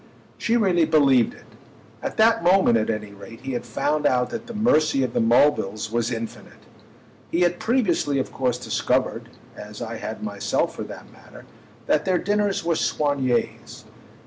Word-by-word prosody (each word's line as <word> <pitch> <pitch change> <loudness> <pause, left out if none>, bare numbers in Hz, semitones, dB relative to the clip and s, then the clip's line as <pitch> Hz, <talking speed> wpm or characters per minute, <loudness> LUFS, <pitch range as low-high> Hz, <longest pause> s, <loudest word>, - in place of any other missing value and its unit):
She 235 +1 +1
really 180 -7 +3
believed 140 -7 +3
it. - - -18 0.6
At - - -5
that 220 -4 +4
moment, 180 -8 +4
at 110 -1 +1
any 105 -2 -4
rate, 115 +4 -12
he 135 +1 -5
had 120 - -4
found 150 0 0
out 125 -1 +1
that 230 - -6
the 235 - -7
mercy 155 - +2
of 125 -2 -3
the - - +1
Mulvilles 115 -3 +2
was 120 0 0
infinite. 115 -1 -7 0.6
He 170 - 0
had 175 0 +2
previously 190 - +1
of 130 - -2
course 125 -2 0
discovered, 125 - -1 0.3
as - - -10
I - - -5
had - - -6
myself - - -1
for - - -5
that - - -11
matter, - - -15 0.4
that 150 +5 +1
their 185 -1 +2
dinners 205 0 0
were 170 0 +1
soignés. 140 -5 -1
145 Hz, 170 wpm, -23 LUFS, 120-180 Hz, 0.6 s, that